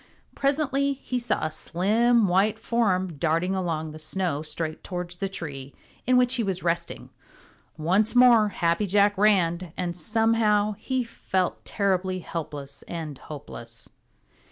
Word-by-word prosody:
Presently 280 0 +1
he 255 -2 -4
saw 235 -8 -1
a 155 - -2
slim 220 +8 +2
white 195 +4 +2
form 190 -8 0
darting 165 +4 +1
along 165 -4 -2
the 155 - -10
snow 165 -2 -1
straight 155 +1 -4
towards 180 -1 -5
the 195 +2 -2
tree 140 -7 -7 0.3
in 255 0 +5
which 250 0 +4
he 245 -3 +1
was 190 -3 -3
resting. 170 0 -2 0.7
Once 190 +9 +1
more 240 -3 +7
Happy 170 +2 0
Jack 205 +2 +3
ran, 185 -4 +2
and 175 -1 -2
somehow 215 +2 +2
he 260 -1 -1
felt 190 -5 -2
terribly 190 -2 0
helpless 150 -5 -6
and 160 -4 -5
hopeless. 120 -6 -8
185 Hz, 135 wpm, -26 LUFS, 165-220 Hz, 0.7 s, more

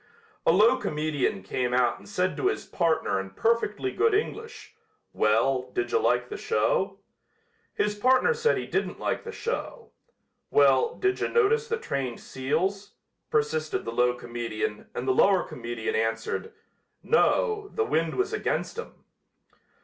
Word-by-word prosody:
A - - +7
low 220 +8 +5
comedian 150 - -1
came 125 +5 -1
out 125 -1 +2
and - - -15
said 185 -2 0
to 380 - 0
his 400 - -1
partner 165 - 0
in 95 0 -5
perfectly 230 - 0
good 425 +2 +2
English: 450 +2 -4 0.4
"Well, 125 +4 +2
didja 380 +4 +1
like - - +1
the 415 - -5
show?" 485 +3 0 0.8
His 210 - +1
partner 255 - +3
said 470 0 +1
he - - -3
didn't - - -2
like - - -2
the 465 - -6
show. 470 +1 -5 0.6
"Well, 135 -2 +4
didja 385 0 0
notice 455 0 +3
the 460 0 -1
trained 135 - -3
seals?" 185 +10 -2 0.3
persisted 155 +1 0
the 115 - -3
low 125 +1 +2
comedian 115 -3 -4
and 130 - -4
the 130 - +4
lower 190 +6 +4
comedian 120 -2 -4
answered: 115 - -1 0.5
"No, 435 -3 +2
the 445 - 0
wind 165 - 0
was 390 +3 -1
against 430 - -2
'em." - - -10
185 Hz, 145 wpm, -27 LUFS, -, 0.8 s, A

